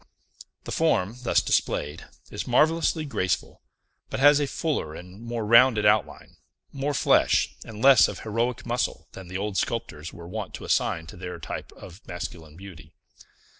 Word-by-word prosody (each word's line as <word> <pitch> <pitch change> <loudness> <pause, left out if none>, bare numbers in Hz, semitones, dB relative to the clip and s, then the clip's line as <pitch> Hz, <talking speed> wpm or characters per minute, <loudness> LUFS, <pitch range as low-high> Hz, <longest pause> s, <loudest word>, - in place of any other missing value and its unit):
The - - -7
form, 100 +6 +1
thus 125 - +2
displayed, 75 +3 -1 0.2
is - - -5
marvellously 160 0 +2
graceful, 95 - -2 0.5
but - - -4
has 145 +1 +6
a 145 - 0
fuller 135 - -2
and 90 +5 -11
more 115 -1 -4
rounded 115 -1 +5
outline, 105 0 +1 0.3
more 140 +1 -2
flesh, - - +3
and 110 -1 -9
less 135 -3 +7
of - - -7
heroic 115 +3 -2
muscle, 120 0 -2
than 95 -2 -10
the 95 +2 -5
old 100 0 -3
sculptors 80 -9 -3
were 85 0 -11
wont 105 +1 -6
to - - -9
assign 80 -1 0
to 80 - -11
their 90 0 -6
types - - -7
of 90 +3 -12
masculine 85 -3 -7
beauty. 85 -5 -12
105 Hz, 160 wpm, -25 LUFS, 90-125 Hz, 0.5 s, less